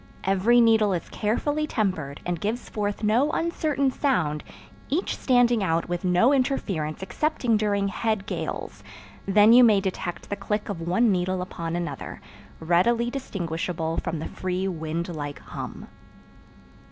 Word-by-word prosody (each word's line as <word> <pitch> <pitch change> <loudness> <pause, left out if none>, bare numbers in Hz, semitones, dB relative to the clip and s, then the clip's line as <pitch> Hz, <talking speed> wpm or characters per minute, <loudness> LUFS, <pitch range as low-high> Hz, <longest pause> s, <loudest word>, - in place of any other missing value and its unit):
Every 195 +6 +4
needle 220 -3 +4
is 175 - -3
carefully 290 +8 -1
tempered 185 - -2
and 175 -2 -2
gives 225 +4 -3
forth 205 0 -3
no 235 +8 +3
uncertain 305 -5 0
sound 160 - 0 0.5
each 330 +7 0
standing 245 -3 +3
out 165 -2 0
with 175 +1 -3
no 185 +9 +4
interference 195 - -1
excepting 250 +1 0
during 205 -2 +1
head 215 0 -1
gales; - - -5 0.4
then 210 +3 +6
you 250 +1 +8
may 215 -4 +6
detect 185 -2 -4
the - - 0
click 210 +2 -3
of 170 -5 -4
one 190 +7 +2
needle 185 0 0
upon 170 -2 -5
another, 175 -1 -5 0.4
readily 230 +9 +2
distinguishable 170 - -3
from 170 -2 -2
the 155 - -5
free 185 +1 -3
wind 165 -1 -3
like 145 -2 -5
hum. - - -8
200 Hz, 140 wpm, -25 LUFS, 175-235 Hz, 0.5 s, you